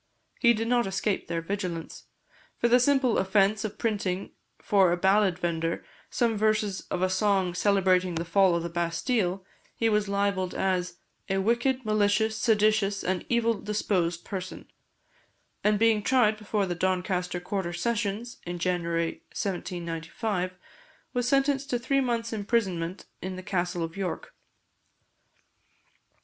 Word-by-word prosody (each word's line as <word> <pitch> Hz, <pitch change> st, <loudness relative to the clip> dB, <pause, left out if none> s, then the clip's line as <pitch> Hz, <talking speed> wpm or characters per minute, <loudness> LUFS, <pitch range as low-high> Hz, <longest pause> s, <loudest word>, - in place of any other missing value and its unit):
He 235 Hz, -2 st, +5 dB
did 225 Hz, +1 st, -2 dB
not 240 Hz, -2 st, +2 dB
escape 195 Hz, +1 st, -1 dB
their 165 Hz, -1 st, -2 dB
vigilance; 180 Hz, -3 st, -4 dB, 0.5 s
for 235 Hz, -, +2 dB
the 245 Hz, +1 st, +5 dB
simple 260 Hz, -2 st, +3 dB
offence 195 Hz, +2 st, +2 dB
of 215 Hz, -, -4 dB
printing 200 Hz, -4 st, -2 dB, 0.3 s
for 195 Hz, -4 st, +3 dB
a 175 Hz, -, +1 dB
ballad 190 Hz, 0 st, +3 dB
vender 165 Hz, -2 st, -2 dB, 0.2 s
some 235 Hz, -2 st, +1 dB
verses 215 Hz, -2 st, 0 dB
of 180 Hz, -, -1 dB
a -, -, +4 dB
song 190 Hz, -2 st, +2 dB
celebrating 185 Hz, -2 st, +2 dB
the 165 Hz, +1 st, -2 dB
fall 185 Hz, +1 st, +4 dB
of 170 Hz, -, -1 dB
the 170 Hz, -, -3 dB
Bastile, 175 Hz, +3 st, -1 dB, 0.3 s
he 225 Hz, -, +1 dB
was 210 Hz, -2 st, +1 dB
libelled 200 Hz, -2 st, 0 dB
as 180 Hz, -2 st, -1 dB, 0.3 s
"a 195 Hz, -, +1 dB
wicked, 240 Hz, +5 st, +1 dB
malicious, 215 Hz, +1 st, +2 dB
seditious, 215 Hz, -3 st, +2 dB
and 185 Hz, 0 st, -1 dB
evil 235 Hz, -1 st, +2 dB
disposed 195 Hz, -5 st, -1 dB
person;" 185 Hz, -2 st, -6 dB, 1.0 s
and 210 Hz, 0 st, +3 dB
being 225 Hz, -1 st, +3 dB
tried 225 Hz, -2 st, +3 dB
before 210 Hz, -1 st, -1 dB
the 180 Hz, -, -2 dB
Doncaster 180 Hz, 0 st, -1 dB
Quarter 180 Hz, 0 st, -3 dB
Sessions, 230 Hz, +3 st, -2 dB
in 175 Hz, 0 st, -5 dB
January 170 Hz, -2 st, -1 dB
1795, 180 Hz, +1 st, -3 dB, 0.6 s
was 245 Hz, -1 st, 0 dB
sentenced 275 Hz, +1 st, +2 dB
to 245 Hz, -, +1 dB
three 275 Hz, +3 st, +1 dB
months' 235 Hz, -2 st, -1 dB
imprisonment 195 Hz, -5 st, -1 dB, 0.2 s
in 185 Hz, 0 st, -4 dB
the 185 Hz, -, -8 dB
Castle 175 Hz, -2 st, -1 dB
of 165 Hz, 0 st, -5 dB
York. 190 Hz, -3 st, -4 dB
195 Hz, 140 wpm, -27 LUFS, 180-220 Hz, 1.0 s, He